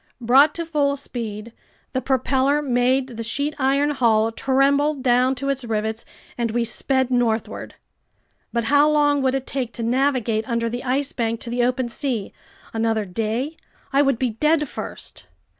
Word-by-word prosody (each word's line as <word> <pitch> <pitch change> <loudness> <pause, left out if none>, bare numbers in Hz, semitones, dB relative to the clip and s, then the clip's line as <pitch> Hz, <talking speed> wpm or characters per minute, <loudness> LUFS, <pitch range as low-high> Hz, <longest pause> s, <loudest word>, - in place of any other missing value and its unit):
Brought 265 +5 +5
to 335 - -2
full 290 -3 +1
speed, 230 -5 -6 0.4
the 260 - 0
propeller 265 +2 +1
made 255 0 +2
the 235 -3 -7
sheet 285 +7 -1
iron 280 +2 +2
hull 225 -5 +2
tremble 280 +4 +2
down 255 0 +2
to 275 +2 -3
its 270 -1 -1
rivets, 220 0 -3 0.3
and 235 -1 0
we 235 +2 0
sped 260 +2 0
northward. 235 -3 -1 0.8
But 235 -1 0
how 285 +5 +4
long 290 -1 +3
would 260 0 +1
it 265 -1 -3
take 255 -4 -3
to 235 - -5
navigate 245 -2 0
under 230 -1 0
the 245 +1 -4
Ice 270 +2 -1
Bank 230 -1 -1
to 235 - -6
the 245 0 +1
open 250 0 0
sea? 235 -4 -3 0.4
Another 225 -1 0
day? 225 - -2 0.4
I 275 - +5
would 275 -4 +2
be 250 -1 0
dead 300 +6 +1
first! - - -8
255 Hz, 165 wpm, -22 LUFS, 230-275 Hz, 0.8 s, Brought